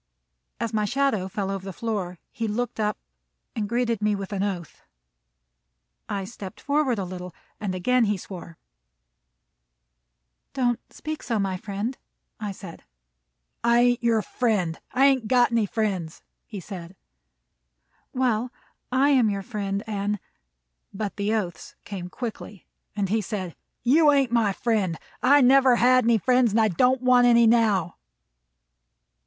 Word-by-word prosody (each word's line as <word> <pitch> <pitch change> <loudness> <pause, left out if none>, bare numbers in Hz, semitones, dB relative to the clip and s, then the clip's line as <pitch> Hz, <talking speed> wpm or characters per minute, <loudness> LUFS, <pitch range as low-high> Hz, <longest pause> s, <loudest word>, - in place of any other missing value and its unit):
As 230 -1 -3
my 215 -1 +1
shadow 235 -4 0
fell 195 0 -3
over 195 -1 -4
the 195 - -6
floor, 190 -3 -3
he 230 - -3
looked 235 +2 -3
up 210 -1 0 0.6
and 210 -2 -2
greeted 235 -2 0
me 210 0 +2
with 195 0 -6
an 195 - -1
oath. 185 -5 -4 1.3
I 200 -1 -2
stepped 190 -2 -9
forward 285 -4 +1
a 195 - -2
little, 180 -1 -8 0.2
and 195 -3 -3
again 245 +7 +2
he 210 -1 0
swore. 175 -3 -10 2.0
"Don't 245 -3 +1
speak 310 0 -6
so, 230 -2 -2
my 195 -2 -1
friend," 210 +5 -4 0.4
I 210 -2 -3
said. 190 -3 -10 0.8
"I 235 0 +4
ain't 245 0 +2
your 225 -2 +2
friend. 200 -9 -1
I 265 +2 +4
ain't 265 -5 +3
got 245 0 +4
any 230 -3 +2
friends," 190 -7 -2 0.2
he 205 - -7
said. 180 -1 -9 1.2
"Well, 250 -2 0 0.4
I 265 +3 +3
am 255 -6 +4
your 200 -1 -3
friend, 200 -2 -3
and 205 -1 -2 0.4
" - - -51
But 205 -2 -3
the 205 +1 -1
oaths 175 -7 -4
came 185 -3 -6
quickly, 210 -3 -7 0.3
and 200 -2 -1
he 220 +2 +1
said: 185 -3 -5 0.3
"You 295 +5 +5
ain't 275 -4 +2
my 230 -4 +3
friend. 200 -6 0 0.2
I 280 +3 +6
never 260 0 +6
had 255 0 +4
any 230 -1 +4
friends, 250 0 +2
and 225 - +3
I 220 -1 +4
don't 250 +8 +2
want 250 -1 +5
any 235 -1 +6
now." 220 -6 +2
215 Hz, 150 wpm, -25 LUFS, 195-245 Hz, 2.0 s, I